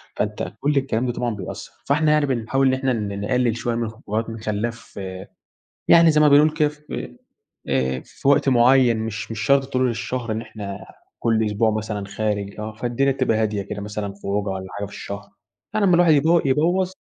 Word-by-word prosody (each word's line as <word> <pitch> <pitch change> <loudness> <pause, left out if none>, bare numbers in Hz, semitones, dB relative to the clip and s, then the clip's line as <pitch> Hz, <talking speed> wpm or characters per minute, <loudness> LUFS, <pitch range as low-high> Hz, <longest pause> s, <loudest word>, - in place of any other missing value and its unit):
فأنتَ - - -3
كل 145 +1 +1
الكلام 130 -3 0
ده 120 - -1
طبعًا 120 -3 -2
بيأثر، 95 -4 -7
فإحنا 150 +2 +2
يعني 150 -1 +3
بنحاول 135 +1 +1
إن 130 - +3
إحنا 130 0 0
ن 100 -3 -3
نقلل 125 0 +1
شوية 120 0 -2
من 115 - -1
الخروجات 110 0 -3
بنخليها 110 +1 -2
ف 120 -3 -13 0.9
يعني 165 -1 +7
زي 150 0 +3
ما 150 - +6
بنقول 145 +2 +6
كده 150 -1 +2
في 150 0 -8 0.5
آآ، 65 -1 0
في - - -6
وقت 140 -1 +4
معين 125 -1 +5
مش 110 0 -4
مش 115 - -5
شرط 135 +4 +3
طول 130 0 +2
الشهر 120 0 -3
إن 110 +1 -2
إحنا 100 -4 -8 0.3
كل 110 -1 +1
أسبوع 105 +1 +1
مثلًا 105 -2 -3
خارج 100 -1 -3
آه، 110 0 -5
فالدينا 120 +4 0
تبقى 130 -4 +1
هادية 110 -2 0
كده 100 +1 -6
مثلًا 105 -1 -4
خروجة 100 +1 -1
والّا 95 0 -4
حاجة 100 0 -4
في 100 - -12
الشهر، 100 +1 -7 0.4
يعني 210 -2 +2
لما 180 - +5
الواحد 170 -2 +5
يب 140 - +3 0.2
يبوظ 175 +7 +2
115 Hz, 195 wpm, -22 LUFS, 105-135 Hz, 0.9 s, يعني